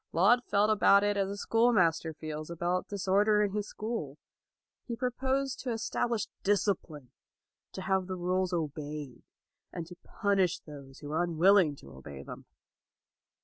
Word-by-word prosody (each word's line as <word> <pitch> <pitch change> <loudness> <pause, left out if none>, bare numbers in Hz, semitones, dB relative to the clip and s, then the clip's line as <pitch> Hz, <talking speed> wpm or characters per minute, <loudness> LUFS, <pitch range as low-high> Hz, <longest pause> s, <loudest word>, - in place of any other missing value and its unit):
Laud 220 +9 +4
felt 210 -1 +2
about 200 -1 +5
it 205 0 +1
as 195 -1 0
a 200 - -5
schoolmaster 200 -9 +2
feels 155 0 -7
about 175 +2 -1
disorder 205 +2 +2
in 205 - 0
his 210 0 -3
school. 210 - -5 0.7
He 235 - -3
pro 250 +1 -1
posed 265 +1 -1
to 255 - -3
establish 230 0 -1 0.2
discipline, 185 - -1 0.6
to 190 - -6
have 190 -1 0
the 185 - -3
rules 185 +1 0
obeyed, 150 -5 -4 0.5
and 170 -2 -5
to 175 +2 -12
punish 195 -4 +1
those 140 -3 -12
who 145 - -7
were 155 +3 0
unwilling 175 -1 +4
to 70 - -14
obey 70 +1 -10
them. - - -10
185 Hz, 150 wpm, -30 LUFS, 155-210 Hz, 0.7 s, about